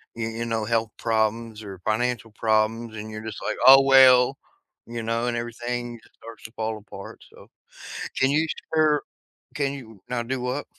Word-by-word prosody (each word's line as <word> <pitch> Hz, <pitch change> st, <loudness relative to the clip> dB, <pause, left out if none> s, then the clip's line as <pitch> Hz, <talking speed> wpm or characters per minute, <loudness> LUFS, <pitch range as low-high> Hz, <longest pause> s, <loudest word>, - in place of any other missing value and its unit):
you 115 Hz, -1 st, -3 dB
you 115 Hz, +1 st, -4 dB
know, 115 Hz, -2 st, -2 dB
health 115 Hz, -1 st, 0 dB
problems 110 Hz, 0 st, -1 dB
or 95 Hz, -2 st, -9 dB
financial 115 Hz, 0 st, -1 dB
problems 110 Hz, +1 st, 0 dB
and 110 Hz, +1 st, -7 dB
you're 110 Hz, 0 st, -7 dB
just 110 Hz, -2 st, -7 dB
like, -, -, -2 dB
"Oh 135 Hz, +1 st, +10 dB
well," 130 Hz, -1 st, +6 dB, 0.5 s
you 115 Hz, -1 st, -5 dB
know, 115 Hz, +2 st, -1 dB
and 120 Hz, -, -1 dB
everything 120 Hz, 0 st, -5 dB
just -, -, -24 dB
starts 115 Hz, 0 st, -12 dB
to 110 Hz, -, -10 dB
fall 110 Hz, 0 st, -2 dB
apart, 105 Hz, -, -11 dB
so, -, -, -16 dB, 0.7 s
can 130 Hz, +1 st, +4 dB
you 155 Hz, +3 st, +2 dB, 0.3 s
share 155 Hz, -2 st, +3 dB, 0.5 s
can 140 Hz, -2 st, -1 dB
you 110 Hz, -7 st, -11 dB
now 125 Hz, -1 st, -2 dB
do 130 Hz, +2 st, -3 dB
what? 125 Hz, +4 st, -3 dB
115 Hz, 180 wpm, -24 LUFS, 110-125 Hz, 0.7 s, Oh